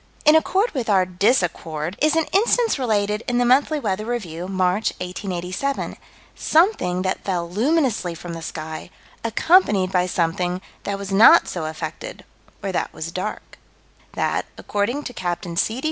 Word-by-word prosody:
In 300 +1 +7
accord 380 +8 +2
with 250 -6 -3
our 190 -3 +4
disaccord 175 -5 0
is 310 +1 +3
an 325 -1 +2
instance 455 - +3
related 210 -3 0
in 245 - 0
the 245 - +3
Monthly 280 +5 +3
Weather 210 -5 -2
Review, 180 -8 -4
March, 185 +2 +1
1887 185 +7 -3 0.4
something 310 - +2
that 190 0 -2
fell 175 -3 -2
luminously 225 - 0
from 170 +1 -7
the 165 - -6
sky, 160 +1 -6 0.3
accompanied 225 - +3
by 180 -1 +2
something 175 +1 -1 0.3
that 200 -1 -2
was 200 -1 -6
not 200 +4 +7
so 175 -3 -4
affected, 160 - -6 0.4
or 195 - -2
that 180 - -2
was 165 +1 -6
dark: 185 +4 -6 0.5
That, - - -1
according 225 +8 -2
to 250 - -6
Capt. 175 -1 -3
C. 225 +3 0
200 Hz, 150 wpm, -22 LUFS, 180-255 Hz, 0.5 s, In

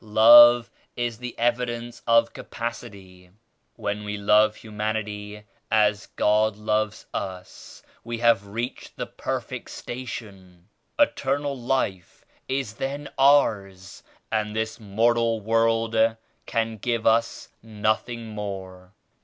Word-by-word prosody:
Love 120 +2 +7 0.2
is 120 -2 -3
the 125 -1 -7
evidence 120 0 -2
of 115 0 +4
capacity. 100 -6 -8 0.5
When 105 +1 -4
we 105 0 -4
love 105 +1 +4
hu 110 - -13
manity 105 -1 -4 0.3
as 105 -1 +2
God 105 0 +2
loves 105 0 -1
us, 95 -1 -7 0.2
we 115 0 -5
have 115 -4 +2
reached 115 +5 -6
the - - -3
perfect - - -5
station. 100 -8 -9 0.3
Eternal 145 - +1
Life 120 -8 -3 0.2
is 130 -5 -2
then 140 +5 -5
ours 100 -10 +2 0.3
and 105 -1 -1
this 110 +1 -3
mortal 115 +2 +1
world 115 +1 +1 0.5
can 115 -1 -1
give 115 +1 -2
us 115 +1 +1
nothing 110 +2 -2
more. 95 -3 -7
110 Hz, 110 wpm, -24 LUFS, 105-120 Hz, 0.5 s, Love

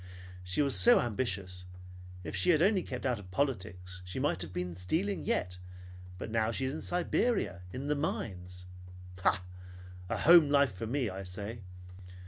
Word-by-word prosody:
She 90 +11 +1
was 140 -2 +1
so 95 - +7
ambitious. 100 -6 -2 0.6
If 80 - -5
she - - +2
had 160 -3 +5
only 195 -1 +3
kept 130 -6 -6
out 125 -4 0
of 95 -3 -12
politics, 95 -6 -3
she 90 +4 -7
might 130 - 0
have 85 - -4
been 90 0 -3
stealing 160 - -1
yet. 90 - -1 0.6
But 110 - -6
now 110 -1 +1
she 125 +3 -1
is 130 - -2
in 155 - -5
Siberia, 180 - 0
in 130 +6 -5
the 145 - +1
mines. 90 - -4 0.6
Bah! 95 - +3 0.7
A - - -1
home 165 -2 +7
life 140 -5 +4
for 100 +5 -5
me, 125 -3 -1
I 95 +1 -6
say! 100 +5 -6
110 Hz, 170 wpm, -31 LUFS, 90-140 Hz, 0.7 s, so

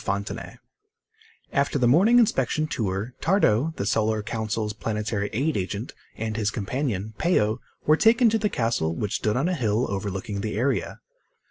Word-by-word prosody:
FONTENAY 100 +1 -4 1.0
After 140 +1 +1
the 125 -3 +3
morning 195 - +5
inspection 155 - +2
tour, 110 -4 -3
Tardo, 160 - +2
the 100 - -3
Solar 110 0 +1
Council's 110 -2 -2
Planetary 105 -1 -2
Aid 140 +8 0
agent, 100 +4 -3 0.2
and 110 -1 -3
his 105 -2 +1
companion, 110 -1 -3
Peo, 110 -11 +2 0.3
were 155 +1 +5
taken 230 +4 +5
to 225 - +2
the 210 0 +1
castle 115 - 0
which 105 +3 -2
stood 105 +2 0
on 140 +6 +1
a 185 - 0
hill 115 -5 +1
overlooking 100 +1 -3
the 105 -1 -3
area. 135 +4 -1
110 Hz, 155 wpm, -25 LUFS, 105-145 Hz, 1.0 s, morning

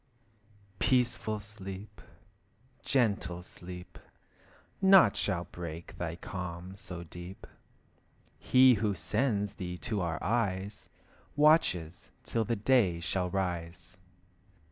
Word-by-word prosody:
Peaceful 120 -4 +1
sleep, 100 -1 -8 0.8
gentle 100 -9 0
sleep, 90 0 -8 0.8
Naught 190 -1 +7
shall 90 -4 0
break 85 -1 -7
thy 85 -2 -3
calm 90 +1 -6
so 90 -3 -7
deep. 90 +3 -10 0.9
He 130 0 +6
who 105 -2 0
sends 105 +3 0
thee 90 -3 -5
to 105 +1 -2
our 85 -2 -1
eyes, 100 -2 -1 0.5
Watches 140 - +3
till 115 - 0
the 115 - 0
day 105 -6 +3
shall 90 +1 -1
rise. 90 -1 -3
95 Hz, 100 wpm, -31 LUFS, 90-110 Hz, 0.9 s, Naught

